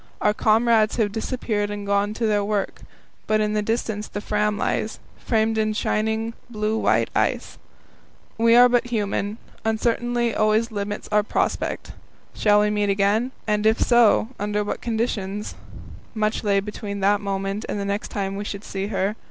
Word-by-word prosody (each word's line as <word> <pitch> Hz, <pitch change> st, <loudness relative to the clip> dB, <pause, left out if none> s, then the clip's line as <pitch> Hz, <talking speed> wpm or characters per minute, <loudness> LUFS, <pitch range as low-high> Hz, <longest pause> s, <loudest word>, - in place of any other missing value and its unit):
Our 210 Hz, -, +2 dB
comrades 220 Hz, 0 st, +3 dB
have 215 Hz, -3 st, +1 dB
disappeared 220 Hz, -2 st, -2 dB
and 205 Hz, 0 st, -5 dB
gone 200 Hz, +1 st, +1 dB
to 230 Hz, -, -1 dB
their 210 Hz, -2 st, +2 dB
work, 205 Hz, -1 st, -2 dB, 0.5 s
but 215 Hz, 0 st, +2 dB
in 210 Hz, 0 st, 0 dB
the 210 Hz, -, +1 dB
distance 220 Hz, -1 st, -2 dB
the 205 Hz, -, -5 dB
Fram 210 Hz, 0 st, 0 dB
lies, -, -, -1 dB, 0.2 s
framed 220 Hz, -1 st, +1 dB
in 215 Hz, 0 st, +1 dB
shining, 220 Hz, +1 st, -1 dB, 0.2 s
blue 215 Hz, -1 st, -1 dB
white -, -, +2 dB
ice. -, -, -1 dB, 0.8 s
We 230 Hz, 0 st, +4 dB
are 245 Hz, +1 st, +9 dB
but 245 Hz, 0 st, +2 dB
human; 210 Hz, -2 st, -2 dB, 0.3 s
uncertainty 235 Hz, +1 st, 0 dB
always 215 Hz, +2 st, +2 dB
limits 205 Hz, 0 st, -4 dB
our 210 Hz, 0 st, +4 dB
prospect. 205 Hz, -, -2 dB, 0.4 s
Shall 210 Hz, -1 st, +4 dB
we 210 Hz, 0 st, +2 dB
meet 205 Hz, -1 st, 0 dB
again? 205 Hz, +5 st, +2 dB
And 210 Hz, -1 st, +1 dB
if 220 Hz, +1 st, +3 dB
so, 235 Hz, -2 st, +4 dB
under 210 Hz, +1 st, -1 dB
what 205 Hz, -, -4 dB
conditions? 215 Hz, -3 st, -2 dB, 0.6 s
Much 215 Hz, +1 st, 0 dB
lay 200 Hz, -2 st, +3 dB
between 200 Hz, 0 st, -6 dB
that 205 Hz, +2 st, +3 dB
moment 195 Hz, +1 st, -2 dB
and 205 Hz, -, -2 dB
the 200 Hz, -, -2 dB
next 200 Hz, +1 st, -2 dB
time 195 Hz, -1 st, -3 dB
we 200 Hz, -, -4 dB
should 200 Hz, 0 st, -6 dB
see 195 Hz, -1 st, -4 dB
her. 195 Hz, 0 st, -1 dB
210 Hz, 170 wpm, -23 LUFS, 205-220 Hz, 0.8 s, are